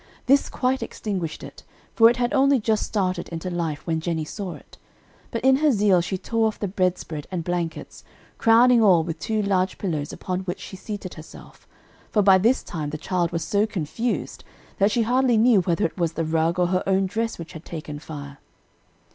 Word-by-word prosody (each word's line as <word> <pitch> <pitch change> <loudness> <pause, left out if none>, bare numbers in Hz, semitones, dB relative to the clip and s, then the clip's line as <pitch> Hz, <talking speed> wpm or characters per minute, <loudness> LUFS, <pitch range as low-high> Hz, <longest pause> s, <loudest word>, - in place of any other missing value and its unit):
This 275 +2 +3
quite 260 +1 0
extinguished 185 -7 -4
it, - - -10 0.3
for 225 0 +7
it 240 - 0
had 245 0 0
only 275 -1 +4
just 215 -1 +1
started 185 -4 -1
into 170 +2 -5
life 165 -4 -3
when 160 -2 0
Jennie 160 -1 -2
saw 190 +2 -6
it; - - -17 0.5
but 230 - -4
in 265 0 +6
her 300 +1 +3
zeal 200 -5 +3
she 185 +2 -3
tore 225 +4 0
off 215 - -3
the 205 - -2
bedspread 180 -5 -2
and 180 -3 -3
blankets, 170 -2 -4 0.4
crowning 235 +1 +5
all 185 -6 +5
with 165 0 -5
two 215 +3 -1
large 190 -2 0
pillows 155 -7 -3
upon 185 -1 -4
which 185 -1 -4
she - - -9
seated 200 -1 -7
herself, 155 0 -13 0.4
for 210 - +2
by 190 -1 +6
this 235 +7 +2
time 155 -3 -5
the 155 - -5
child 175 +1 -1
was 165 - -2
so 205 +1 +1
confused 215 +5 -3 0.4
that 200 +1 +4
she 230 +2 +1
hardly 250 +1 +2
knew 225 -3 +5
whether 175 -2 0
it 165 - -4
was 170 -2 0
the 165 -1 -2
rug 165 +2 +1
or 180 -1 +2
her 185 0 +1
own 195 0 +2
dress 225 +4 -2
which 170 -1 -9
had 160 - -9
taken 150 -3 -7
fire. 145 -2 -9
185 Hz, 200 wpm, -24 LUFS, 165-220 Hz, 0.5 s, for